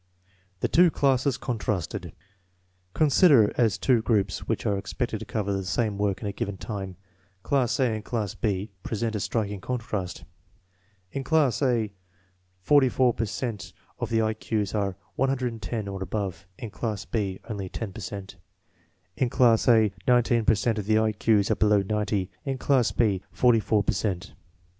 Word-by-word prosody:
The - - +2
two 175 +1 +5
classes 135 -2 +1
contrasted. 100 - -3 0.8
Considered 145 - +5
as 115 -5 +2
two 125 -4 +3
groups 105 -5 0
which - - -2
are 100 - +2
expected 100 - -3
to - - -7
cover 100 -2 -2
the 95 0 -2
same 100 +3 -1
work 100 -2 0
in 105 - -3
a - - -1
given 100 0 -4
time, 95 -4 -6 0.5
class 130 -3 +1
A 125 -4 +2
and 110 -1 -4
class 110 -3 -3
B 105 -1 -2
present 110 +2 -2
a - - -1
striking 105 -2 -2
contrast. 105 -8 -4 0.9
In 135 - -4
class 150 -5 +2
A, 120 -6 +1 0.7
44 130 +1 +4
per 115 - -1
cent 110 0 -5 0.3
of - - -3
the 115 -1 +2
I 110 0 +1
Q's 105 -2 -2
are 100 -3 -1 0.2
110 120 -5 -1
or 95 -1 -5
above; 95 -1 -4
in 115 - -7
class 105 -2 -4
B, 100 -5 -2
only 100 -4 -5
10 105 -1 -5
per 110 - -8
cent. 95 -1 -7 0.8
In 130 - 0
class 115 -2 +3
A, 110 -4 +5 0.2
19 120 -2 +3
per 110 - +5
cent 110 +2 0
of 100 - -5
the 110 0 +4
I 110 0 +2
Q's 105 -1 +2
are - - +3
below 105 -2 +3
90; 105 -2 -1
in 135 -1 -2
class 130 -2 +2
B, 100 -5 +1
44 115 -4 +3
per - - +1
cent. 95 -2 -3
110 Hz, 165 wpm, -26 LUFS, 100-120 Hz, 0.9 s, two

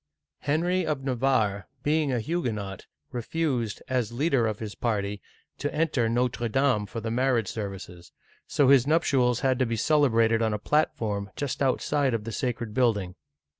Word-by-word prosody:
Henry 170 +6 +1
of 150 -4 -2
Navarre, 120 -7 +1 0.2
being 150 -1 +1
a 125 - 0
Huguenot, 110 - -3 0.2
refused, 125 -3 -2
as 125 -4 -1
leader 135 -2 +1
of 110 -2 -2
his 105 -1 -6
party, 105 -4 -2 0.4
to 145 - -2
enter 150 -7 +1
Notre 120 0 0
Dame 125 -4 +2
for 115 - -5
the 115 0 -4
marriage 120 -3 +1
ser 105 -3 -3
vices, 90 -3 -11 0.4
so 140 -3 +3
his 135 -2 +6
nuptials 130 -6 +2
had 130 -2 +1
to 130 - +3
be 115 - -1
celebrated 115 -5 +3
on 110 -2 +1
a - - -1
platform 105 -6 0
just 145 -1 -3
outside 135 0 +1
of 110 - -3
the 115 - -5
sacred 120 -4 -3
building. 105 -8 +1
120 Hz, 165 wpm, -27 LUFS, 110-140 Hz, 0.4 s, his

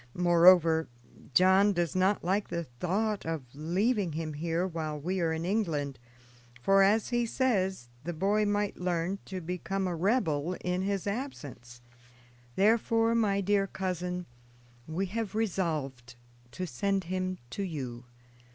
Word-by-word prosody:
Moreover, 170 -2 +5 0.5
John 190 +5 +5
does 175 -3 -1
not 190 +2 +2
like 195 +4 0
the 170 - -3
thought 185 - -2
of 160 -3 -3
leaving 180 - 0
him 155 0 -3
here 165 +3 -1
while 160 -4 -4
we 185 +6 -2
are 165 -1 +1
in 160 +1 -2
England; 160 - -1 0.6
for, 195 +10 +4
as 205 +3 +3
he 240 -1 +1
says, 190 - 0 0.2
the 175 - -3
boy 200 +6 +1
might 205 -1 0
learn 180 +2 -1
to 190 -1 -5
become 180 +3 -3
a 175 - -2
rebel 175 - +1
in 180 0 -1
his 195 -1 -1
absence; 145 - -6 0.7
therefore, 225 +2 +3
my 205 -4 +2
dear 200 0 +2
cousin, 180 -1 -3 0.6
we 170 +5 -1
have 215 +2 -4
resolved 155 - -2 0.3
to 185 +8 -5
send 195 +7 -1
him 185 +1 -2
to 200 - -4
you. 130 -10 -5
185 Hz, 140 wpm, -30 LUFS, 165-200 Hz, 0.7 s, Moreover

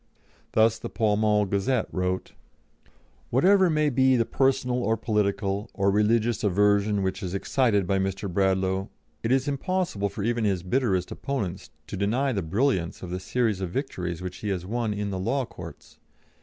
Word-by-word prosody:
Thus 110 0 +3
the - - -6
Pall 105 -2 +1
Mall 105 -1 +2
Gazette 100 +5 0
wrote: 90 0 -2 1.0
"Whatever 185 +8 +4
may 150 -2 +2
be 130 +1 +4
the 115 -2 +2
personal 130 -1 +1
or 115 -1 +1
political 100 -2 -1
or 100 -1 +2
religious 110 +2 +2
aversion 100 +1 +2
which 95 0 -2
is 95 0 -4
excited 105 -1 +1
by 95 +2 +1
Mr. 95 +1 -2
Bradlaugh, 95 +1 +1 0.3
it 115 - -1
is 135 +2 +2
impossible 145 - -1
for 100 +1 -5
even 120 +1 0
his 95 -4 0
bitterest 95 -3 0
opponents 100 -9 -4 0.2
to - - -6
deny 120 +8 +1
the 100 -5 -1
brilliance 95 - 0
of 90 - -6
the 90 - -3
series 105 +1 0
of 95 - -2
victories 90 - -4
which 90 0 -5
he 105 - -4
has 90 -3 -2
won 115 +2 -1
in 105 -1 -3
the 95 - -3
law 125 +7 0
courts. - - -12
105 Hz, 170 wpm, -26 LUFS, 95-120 Hz, 1.0 s, Whatever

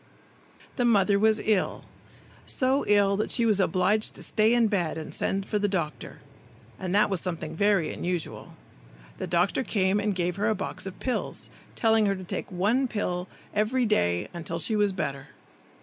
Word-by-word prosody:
The 245 - +1
mother 200 -4 +3
was 220 +1 +3
ill, 215 -4 0 0.6
so 265 +2 +1
ill 200 -1 +4
that 210 - -1
she 235 - +2
was 215 -3 +3
obliged 190 +4 +1
to - - -9
stay 220 +2 +2
in 235 -2 +4
bed 175 -7 -1
and 155 - -7
send 195 0 -1
for 210 - -1
the 205 - +1
doctor, 170 -6 -4 0.6
and 185 0 -2
that 210 - +5
was 190 - 0
something 165 -3 -4
very 200 -2 +2
unusual. 175 -2 -4 0.6
The - - -4
doctor 175 +7 +1
came 195 -3 +1
and 205 -1 -1
gave 180 0 -1
her 210 +2 +1
a 220 - +1
box 195 - -5
of 190 - -8
pills, 255 - -3 0.2
telling 220 -2 +3
her 195 - +1
to 185 - -8
take 180 - -5
one 220 +9 +1 0.6
every 225 +4 +1
day 85 - +1
until 170 -1 -4
she 215 +6 +1
was 205 -1 +2
better. 140 -7 -4
200 Hz, 175 wpm, -27 LUFS, 180-215 Hz, 0.6 s, that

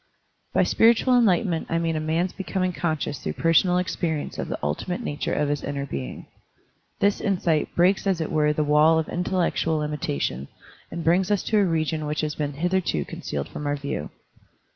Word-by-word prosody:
By - - +3
spiritual 235 +3 +4
enlightenment 190 -7 +2
I 165 - +1
mean 165 -1 0
a - - 0
man's 165 +4 -1
becoming 185 -1 -2
conscious 155 -4 -2
through - - -4
personal 170 +2 +3
experience 165 -4 -2
of - - -3
the - - -3
ultimate 75 - -2
nature 145 -10 -3
of 150 - +1
his 145 0 -2
inner 140 -1 -3
being. 65 - -6 0.8
This 200 0 +2
insight 175 -6 0
breaks 185 +3 +3
as 190 -3 +1
it 160 - -3
were 150 -1 +3
the 150 0 0
wall 150 +2 +5
of 160 - 0
intellectual 175 -3 0
limitation 135 - -2 0.4
and 170 - -5
brings 175 +3 +3
us 205 -2 +1
to 215 - +2
a 200 - +4
region 160 -2 -1
which 150 +1 -1
has 155 -1 -2
been 145 -1 -3
hitherto 170 - 0
concealed 70 -1 -5
from 150 - -5
our 145 - +1
view. 140 - -4
160 Hz, 185 wpm, -24 LUFS, 150-180 Hz, 0.8 s, wall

